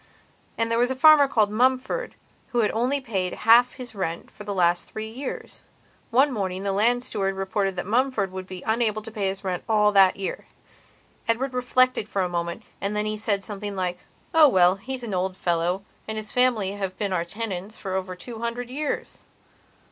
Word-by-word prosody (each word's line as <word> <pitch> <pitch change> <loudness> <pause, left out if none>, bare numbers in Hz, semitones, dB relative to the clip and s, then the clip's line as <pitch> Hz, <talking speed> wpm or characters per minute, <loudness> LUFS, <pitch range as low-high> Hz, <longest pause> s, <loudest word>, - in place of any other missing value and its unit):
And 230 0 0
there 230 - +2
was 245 +1 +3
a 260 - -1
farmer 295 +1 +7
called 215 -5 +2
Mumford 260 - +1 0.4
who 240 - +3
had 210 - +2
only 250 +5 0
paid 195 -8 -2
half 240 +2 +7
his 250 -3 -9
rent 170 -5 -4
for 210 - -11
the 205 - -5
last 175 -2 +2
three 220 0 -5
years. 260 +4 -6 0.5
One 270 +5 +4
morning 190 -3 -2
the 200 - 0
land 235 +5 +2
steward 195 -5 -2
reported 195 0 -1
that 175 - -3
Mumford 225 -2 +1
would 185 0 -6
be 185 -1 -8
unable 220 -1 0
to 225 - -9
pay 205 -3 -1
his 190 +1 -4
rent 185 -2 -2
at 225 - -6
all 210 -1 +4
that 195 -2 +5
year. 195 - -5 0.8
Edward 250 +3 0
reflected 250 -2 +2
for 195 - 0
a - - 0
moment 170 +4 -3 0.2
and 200 +1 -2
then 210 0 0
he 215 0 -1
said 210 -2 -1
something 205 -1 -5
like: 180 -2 -2 0.3
"Oh 320 -2 +8
well, 185 -4 +4
he's 250 +5 -6
an 220 -4 -4
old 185 0 -1
fellow 175 +2 0 0.2
and 220 0 -4
his 215 -1 -6
family 245 -6 +2
have 195 -2 -4
been 200 -3 -1
our 170 -2 +1
tenants 200 +1 -6
for 190 -2 -5
over 185 -1 -3
two 225 +5 -9
hundred 235 +1 -4
years. 295 +2 -3
210 Hz, 200 wpm, -25 LUFS, 190-240 Hz, 0.8 s, Oh